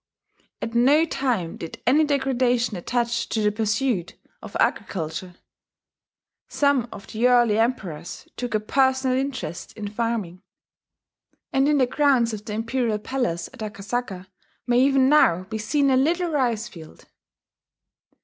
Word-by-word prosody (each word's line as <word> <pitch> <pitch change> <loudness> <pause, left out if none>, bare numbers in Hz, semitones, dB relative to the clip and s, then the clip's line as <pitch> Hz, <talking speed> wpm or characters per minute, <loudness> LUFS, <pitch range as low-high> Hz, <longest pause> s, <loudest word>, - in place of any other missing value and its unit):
At 230 - -4
no 275 +7 +4
time 245 - -2
did 165 - -8
any 290 +6 +4
degradation 255 -5 +1
attach 235 +5 -1
to 225 - -1
the 210 -1 +2
pursuit 215 -2 -1 0.3
of - - -6
agriculture. 175 0 -2 1.1
Some 280 -5 +1
of 200 - -10
the 230 +3 +1
early 240 -4 +4
emperors 195 -10 -3
took 245 -3 -3
a - - +3
personal 260 +3 +1
interest 265 -9 -4
in 210 -2 -6
farming; 210 -5 -3 1.1
and 270 +1 +3
in 300 - +3
the 260 - +4
grounds 250 -4 +2
of 210 -1 -6
the 215 - -5
Imperial 230 0 -1
Palace 210 -7 -2
at - - -15
Akasaka 205 -2 -4 0.4
may 245 0 +3
even 270 0 +4
now 185 - +4
be 220 +3 -6
seen 275 +6 +1
a 260 - +4
little 335 +5 +1
rice 240 -6 0
field. 165 -9 -13
240 Hz, 140 wpm, -24 LUFS, 210-265 Hz, 1.1 s, no